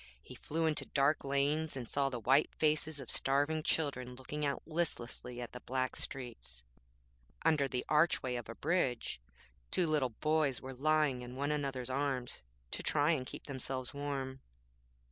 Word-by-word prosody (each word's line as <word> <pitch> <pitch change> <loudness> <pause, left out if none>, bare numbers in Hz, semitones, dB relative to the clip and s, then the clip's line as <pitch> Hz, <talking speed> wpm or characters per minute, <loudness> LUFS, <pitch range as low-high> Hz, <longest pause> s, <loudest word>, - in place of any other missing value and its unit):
He - - -10
flew 160 +2 -1
into 155 -1 +1
dark 140 +2 +3
lanes, 140 +2 +1
and 120 -3 -4
saw 140 +2 +2
the 125 -3 -3
white 135 +6 +4
faces 155 -1 +2
of 130 - -5
starving 145 +4 +2
children 130 -6 0
looking 145 +4 -5
out 140 -1 0
listlessly 125 -7 -3
at 120 - -5
the 125 - -7
black 130 0 -1
streets. 120 - -4 0.8
Under 155 -4 +4
the 125 -2 -2
archway 150 -4 +3
of 120 -2 -4
a 115 - -5
bridge 130 - 0 0.5
two 180 - +2
little 150 -5 +2
boys 150 +2 +1
were 130 0 -7
lying 150 -1 +2
in 125 +1 -7
one 140 +2 0
another's 135 -4 -1
arms 130 -2 -1 0.3
to - - -1
try 150 +1 +3
and 130 -6 0
keep - - -8
themselves 130 -2 -3
warm. 135 -2 -3
140 Hz, 165 wpm, -34 LUFS, 125-150 Hz, 0.8 s, white